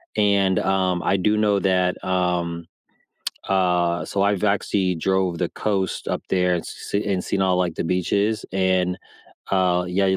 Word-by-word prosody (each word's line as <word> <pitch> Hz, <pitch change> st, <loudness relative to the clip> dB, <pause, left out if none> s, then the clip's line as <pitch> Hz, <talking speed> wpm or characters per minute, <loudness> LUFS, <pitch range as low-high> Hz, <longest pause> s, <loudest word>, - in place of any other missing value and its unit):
and, 100 Hz, -3 st, +3 dB
um, 95 Hz, -2 st, +1 dB
I 100 Hz, -, +2 dB
do 105 Hz, +3 st, +1 dB
know 105 Hz, -2 st, +2 dB
that, 90 Hz, -1 st, +1 dB
um, 90 Hz, -2 st, -1 dB, 0.8 s
uh 90 Hz, -2 st, +1 dB
so 100 Hz, -, -1 dB
I've 100 Hz, 0 st, +1 dB
actually 100 Hz, -2 st, +1 dB
drove 95 Hz, 0 st, 0 dB
the -, -, 0 dB
coast 95 Hz, -3 st, -2 dB
up -, -, -2 dB
there 90 Hz, -1 st, +2 dB
and 85 Hz, -, -2 dB
s -, -, -9 dB
s 100 Hz, -, +2 dB
and 95 Hz, -2 st, 0 dB
seen 95 Hz, -, 0 dB
all, 95 Hz, -1 st, +2 dB
like, 90 Hz, -3 st, 0 dB
the -, -, -3 dB
beaches 100 Hz, +5 st, 0 dB
and, 95 Hz, -1 st, +1 dB, 0.6 s
uh, 90 Hz, -2 st, +2 dB
yeah, 95 Hz, +2 st, +1 dB
95 Hz, 165 wpm, -22 LUFS, 90-100 Hz, 0.8 s, and